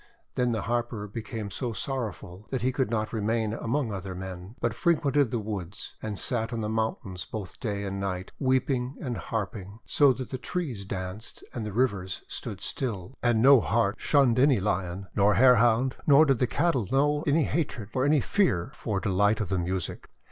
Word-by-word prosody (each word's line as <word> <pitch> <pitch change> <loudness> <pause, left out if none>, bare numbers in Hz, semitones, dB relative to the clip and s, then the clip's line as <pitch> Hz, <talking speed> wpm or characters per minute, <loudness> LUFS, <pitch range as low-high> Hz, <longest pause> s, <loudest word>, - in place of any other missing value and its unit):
Then 125 -1 +1
the 110 -3 -1
Harper 120 -2 -2
became 110 -1 -5
so 120 +1 -3
sorrowful 105 -6 -5
that 130 - -2
he 130 - +2
could 130 -3 0
not 110 -1 -1
remain 110 0 0
among 115 0 -1
other 95 -1 -5
men, 95 +2 -7
but - - 0
frequented 145 -6 +2
the 120 - -1
woods, 105 -2 -5
and 105 -2 -4
sat 115 -2 -1
on 115 -2 -2
the 105 - -1
mountains 110 -4 -2
both 105 +4 -7
night 110 -4 0
and 100 0 -3
day, 95 -2 -2
weep 130 -2 +2
ing 125 +1 -1
and 125 -3 -3
harping 105 -2 -4
so 145 -2 +5
that 130 0 -7
the 130 - -3
trees 130 - -3
danced 95 +3 -6
and 115 -3 -4
the - - -4
rivers 100 -5 -1
stood - - -6
still, 115 -2 -3
and 120 -2 +3
no 135 0 +8
Hart 110 -2 +1
shunned 135 -5 +3
any 135 -1 +5
Lion, 95 -1 -2
nor 100 +1 +4
Hare 125 0 +7
Hound, 120 +3 +3
nor 150 +2 +7
did 135 -5 +2
the 125 - +2
cattle 140 - +1
know 145 +2 +2
any 150 +2 +4
hatred 135 - -2
or 130 - +1
any 145 0 +4
fear 135 - +1
for 105 -9 -2
delight 105 +2 +2
of 105 -5 -2
the 95 - 0
music. 90 0 -3
115 Hz, 190 wpm, -28 LUFS, 100-130 Hz, -, no